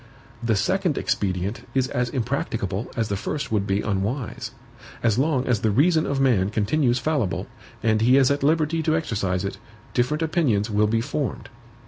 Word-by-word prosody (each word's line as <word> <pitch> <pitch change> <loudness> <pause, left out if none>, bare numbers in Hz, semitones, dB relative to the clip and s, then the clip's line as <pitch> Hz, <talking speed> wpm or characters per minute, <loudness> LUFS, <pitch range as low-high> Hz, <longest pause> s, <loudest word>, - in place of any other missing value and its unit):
The 115 -2 +1
second 185 - +1
expedient 95 +3 -2
is 130 -1 +2
as 125 0 -1
impracticable 115 -5 -2
as 115 -2 0
the 100 - 0
first 140 +8 -4
would 105 -2 0
be 100 +1 +1
unwise. 105 +6 -2 0.5
As 115 0 +2
long 135 -2 +1
as 120 -6 +1
the 110 - +2
reason 155 - +3
of 140 -1 -1
man 115 -8 +3
continues 120 +4 +1
fallible, 130 - -1 0.4
and 110 -1 +2
he 125 +4 +5
is 135 0 +4
at 140 - 0
liberty 160 +2 +2
to 155 0 +1
exercise 100 - -1
it, 95 0 -5 0.3
different 140 +6 +1
opinions 125 - +1
will 105 +1 +3
be 115 +1 +1
formed. 130 -3 -3
120 Hz, 170 wpm, -24 LUFS, 105-145 Hz, 0.5 s, he